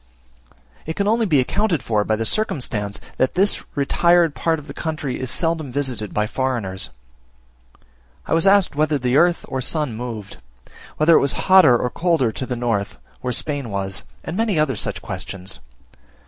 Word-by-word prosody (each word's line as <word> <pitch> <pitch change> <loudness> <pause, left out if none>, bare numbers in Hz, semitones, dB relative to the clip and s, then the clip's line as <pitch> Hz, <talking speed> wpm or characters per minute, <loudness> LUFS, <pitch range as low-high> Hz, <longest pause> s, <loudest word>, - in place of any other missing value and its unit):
It 160 - -3
can 200 - 0
only 225 +1 +2
be 150 -6 +4
accounted 165 - 0
for 105 -2 +1
by 110 - 0
the 115 +1 -2
circumstance 110 - -1 0.2
that 130 - +1
this 195 +3 +2 0.2
retired 170 +3 +3
part 165 +1 0
of 150 - -10
the 140 - -9
country 155 -5 -4
is 130 - -4
seldom 160 +1 -1
visited 125 -6 -2
by 105 - 0
foreigners. 110 - -3 1.4
I - - -2
was 165 +3 +3
asked 195 -5 +4
whether 150 0 +2
the 125 -1 0
earth 175 +2 +3
or 130 - -3
sun 145 -3 -2
moved; 110 - -6 0.6
whether 160 +2 +5
it - - +7
was 140 - +2
hotter 185 -10 +7
or 125 +1 -2
colder 165 -8 +1
to 130 +4 -5
the 125 - -2
north; 115 -4 -2 0.2
where 125 - -3
Spain 140 0 -3
was, 95 -1 -3 0.2
and 160 - -5
many 220 -4 +1
other 150 -4 +2
such - - -3
questions. 95 -7 -5
135 Hz, 175 wpm, -21 LUFS, 115-165 Hz, 1.4 s, it